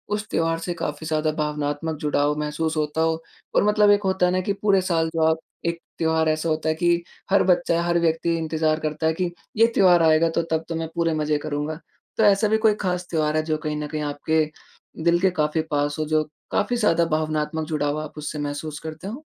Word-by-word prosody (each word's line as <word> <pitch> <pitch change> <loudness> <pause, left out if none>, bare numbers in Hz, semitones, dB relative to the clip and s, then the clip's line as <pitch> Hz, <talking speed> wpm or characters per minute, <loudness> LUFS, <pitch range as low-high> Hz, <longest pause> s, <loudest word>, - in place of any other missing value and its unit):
उस 215 +1 -5
त्योहार 165 0 +1
से 175 +1 -3
काफ़ी 155 -2 -4
ज़्यादा 155 -1 +1
भावनात्मक 150 +1 -2
जुड़ाव 150 0 +1
महसूस 150 +2 -2
होता 150 +1 -1
हो 160 0 +1 0.3
और - - +5
मतलब 210 0 +4
एक 205 0 +3
होता 190 -1 +2
है 180 - +2
ना 185 - +1
कि 200 +2 -1
पूरे 195 -2 +4
साल 165 -3 0
जो 160 - +1
आप 160 0 +3 0.3
एक 170 0 -1 0.2
त्योहार 160 -1 +2
ऐसा 155 +1 0
होता 155 0 0
है 155 - +1
कि 170 +1 +1 0.3
हर 200 - +5
बच्चा 175 -2 +2
हर 170 0 +2
व्यक्ति 165 0 +1
इंतज़ार 160 -1 0
करता 155 0 -1
है 160 - +2
कि 175 +1 -2 0.3
ये 225 +1 +6
त्योहार 175 -3 +5
आएगा 160 +1 +4
तो - - +4
तब 160 0 +1
तो 165 - -2
मैं 165 0 -2
पूरे 165 -1 +1
मज़े 150 -1 0
करूँगा। 150 +1 -2 0.4
तो 220 - +3
ऐसा 205 +1 +4
भी 220 +1 +3
कोई 215 - +5
ख़ास 180 -1 -1
त्योहार 155 -2 0
है 155 - +1
जो 155 -1 -1
कहीं 155 0 -3
न 150 - -4
कहीं 155 0 -4
आपके 155 +2 0 0.6
दिल 170 +1 +4
के 190 +1 +3
काफ़ी 150 +1 +1
पास 145 0 0
हो 155 - 0
जो 155 0 +1 0.3
काफ़ी 245 +4 +1
ज़्यादा 170 -7 +3
भावनात्मक 155 0 -2
जुड़ाव 150 -1 -1
आप 155 0 -9
उससे 150 0 -5
महसूस 145 +1 -4
करते 160 +3 -7
हों? 245 +9 -7
160 Hz, 225 wpm, -23 LUFS, 155-175 Hz, 0.6 s, ये